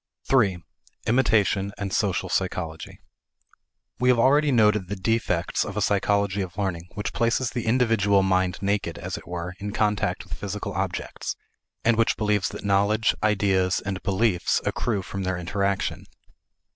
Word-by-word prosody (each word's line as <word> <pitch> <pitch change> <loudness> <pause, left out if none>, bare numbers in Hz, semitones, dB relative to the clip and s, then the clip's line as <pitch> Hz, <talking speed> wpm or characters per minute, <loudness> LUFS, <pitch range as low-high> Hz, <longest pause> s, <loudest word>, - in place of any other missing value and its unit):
3. 110 -9 +3 0.5
Imitation 105 -5 +2
and 100 -1 -4
Social 95 -3 0
Psychology. 85 -4 -3 1.0
We 125 - +3
have 125 - +5
already 145 +5 +4
noted 105 -5 +3
the 100 - -3
defects 115 +4 0
of - - -6
a - - +1
psychology 100 0 +1
of 95 0 -6
learning 90 -4 -3
which 105 - -3
places 115 +1 +1
the 120 -2 -4
individual 110 -5 +3
mind 95 -1 +1
naked, 100 -5 -1
as - - -5
it - - -10
were, 90 +1 -5
in 105 0 -5
contact 105 -3 0
with - - -10
physical 105 0 -4
objects, 95 -2 -3 0.5
and 115 -1 +4
which 115 - +2
believes 105 -3 +1
that - - -8
knowledge, 100 +2 +3
ideas, 95 -3 +2
and 95 -1 -4
beliefs 100 -2 +1
accrue 105 -6 -1
from 95 +1 -5
their 95 -1 -1
interaction. 100 +3 -2
100 Hz, 150 wpm, -25 LUFS, 95-110 Hz, 1.0 s, have